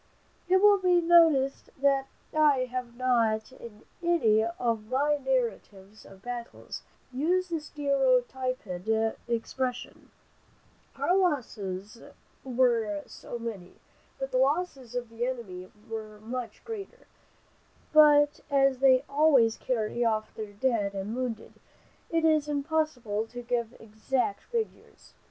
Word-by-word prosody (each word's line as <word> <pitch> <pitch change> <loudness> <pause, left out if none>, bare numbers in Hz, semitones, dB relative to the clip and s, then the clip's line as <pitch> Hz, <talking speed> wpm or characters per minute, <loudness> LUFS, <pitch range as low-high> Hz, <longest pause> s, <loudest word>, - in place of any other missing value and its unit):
It 375 +2 +4
will 410 -1 +7
be 360 -2 +4
noticed 325 -6 +4
that 275 -1 +2 0.3
I 290 -4 +4
have 250 -2 -5
not 230 -3 +1
in 230 -4 -12 0.2
any 260 -12 +3
of 230 -1 -2
my 290 +3 +2
narratives 215 -6 -3
of 195 0 -16
battles, 240 -1 -7 0.3
used 350 +7 0
the 330 - 0
stereotyped 265 -4 0 0.6
expression, 250 +2 -3 0.9
"Our 360 - +1
losses 220 - -2 0.4
were 235 -6 +1
so 240 - -8
many, 220 -6 -7 0.4
but 270 0 -4
the 255 - +1
losses 270 -4 0
of 245 -2 -3
the 230 +2 -3
enemy 190 -8 -6 0.2
were 215 -2 -7
much 230 0 -6
greater, 435 -4 -8 0.9
but 295 -1 +6
as 275 -2 +3
they 260 -1 +5
always 280 -6 +4
carry 240 -1 -1
off 220 -2 0
their 215 -2 -7
dead 205 -3 0
and 195 +4 -4
wounded, 245 -3 -4 0.6
it 330 -1 +1
is 310 -2 +3
impossible 285 -8 -1
to 245 +1 -8
give 235 -1 -2
exact 245 - -2
figures." 465 -2 -5
255 Hz, 120 wpm, -28 LUFS, 225-290 Hz, 0.9 s, will